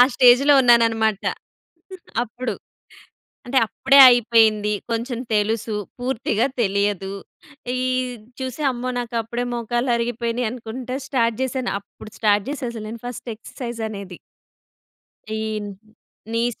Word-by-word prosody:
స్టేజ్‌లో 255 +3 +6
ఉన్నాను 235 -1 +6
అన్నమాట. 220 -2 0 1.0
అప్పుడు. 245 +2 -4 0.9
అంటే 265 +2 0
అప్పుడే 270 +5 +3
అయిపోయింది. 220 -3 +3 0.2
కొంచెం 235 +1 -2
తెలుసు, 215 +1 0 0.2
పూర్తిగా 245 -2 0 0.2
తెలియదు. 200 -1 0 0.7
ఈ - - -1 0.6
చూసి, 260 +3 -5
అమ్మో! 250 +1 -4
నాకు 240 -1 -5
అప్పుడే 235 +2 -4
మోకాళ్ళు 240 +2 -1
అరిగిపోయినాయి 235 0 -1
అనుకుంటా 250 +1 -6
స్టార్ట్ 235 -5 +1
చేశాను. 260 -1 -2
అప్పుడు 200 +1 -14
స్టార్ట్ 205 -2 +3
చేసా 275 -3 -4
అసలు 220 -2 -7
నేను 230 0 -8
ఫస్ట్ 245 0 -8
ఎక్సర్‌సైజ్ 235 +1 -7
అనేది. 195 -4 -8 1.2
ఈ - - -3 0.9
నీస్ 235 0 -1
235 Hz, 110 wpm, -22 LUFS, 220-245 Hz, 1.2 s, స్టేజ్‌లో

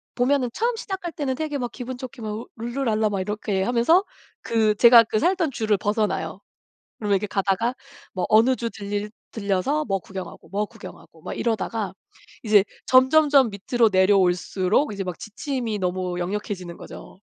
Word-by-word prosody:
보면은 255 0 +2
처음 475 +1 0
시작할 380 -6 -5
때는 275 -3 -2
되게 300 0 -3
막 245 -2 -3
기분 255 0 -6
좋게 250 -2 -9
막 215 +1 -5
룰루랄라 230 -2 0
막 200 -2 -2
이렇게 205 0 -2
하면서 245 - +3 0.4
그 220 -2 +1
제가 235 +1 +8
그 215 -1 -1
살던 350 - +1
주를 220 -4 0
벗어나요. 210 +2 -1 0.6
그러면 205 -2 0
이렇게 195 - -2
가다가 195 +5 0 0.4
뭐 185 -2 -1
어느 235 +4 +5
주 235 -1 -3
들 205 0 -4 0.2
들려서 210 +8 0
뭐 195 -3 -1
구경하고, 190 0 -9
뭐 205 +2 -1
구경하고 - - -13
막 - - -5
이러다가 220 -3 -2 0.5
이제 210 -3 +5 0.2
점점점 270 0 +5
밑으로 225 +4 +1
내려올수록 190 +5 +2
이제 200 -1 -4
막 180 -2 -5
지침이 230 -1 -4
너무 180 -1 -2
역력해지는 185 -1 -4
거죠. - - -11
220 Hz, 350 characters per minute, -24 LUFS, 200-255 Hz, 0.6 s, 제가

